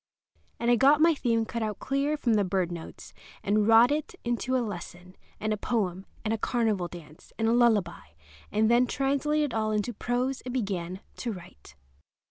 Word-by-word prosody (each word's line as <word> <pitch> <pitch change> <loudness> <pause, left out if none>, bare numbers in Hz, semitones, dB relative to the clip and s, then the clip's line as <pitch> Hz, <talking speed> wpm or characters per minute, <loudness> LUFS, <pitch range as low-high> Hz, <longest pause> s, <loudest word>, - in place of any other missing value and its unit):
And 235 +1 +2
I 240 - +5
got 280 +5 +5
my 330 +1 +5
theme 230 -6 0
cut 235 +1 -4
out 215 -2 -2
clear 280 +2 -1
from 240 -6 +1
the 210 -2 +3
bird 185 -2 -1
notes, 170 -2 -9 0.3
and 210 +1 +2
wrought 230 +3 +7
it 305 +4 -2
into 240 +2 0
a 245 - 0
lesson, 180 -2 -8 0.2
and 215 0 -1
a - - -2
poem, 195 -4 -2 0.2
and 220 - +1
a 225 - -2
carnival 215 -7 0
dance, 160 -3 -13
and 225 - +1
a 230 - +3
lullaby; 220 - +2 0.4
and 220 +1 +2
then 240 +2 +4
translated 280 +2 0
it - - -3
all 215 -1 0
into 215 +3 -1
prose 250 +4 -2
and 250 0 -6
began 190 -5 -3 0.2
to 240 - -3
write. 70 - -13
225 Hz, 190 wpm, -28 LUFS, 195-250 Hz, 0.4 s, wrought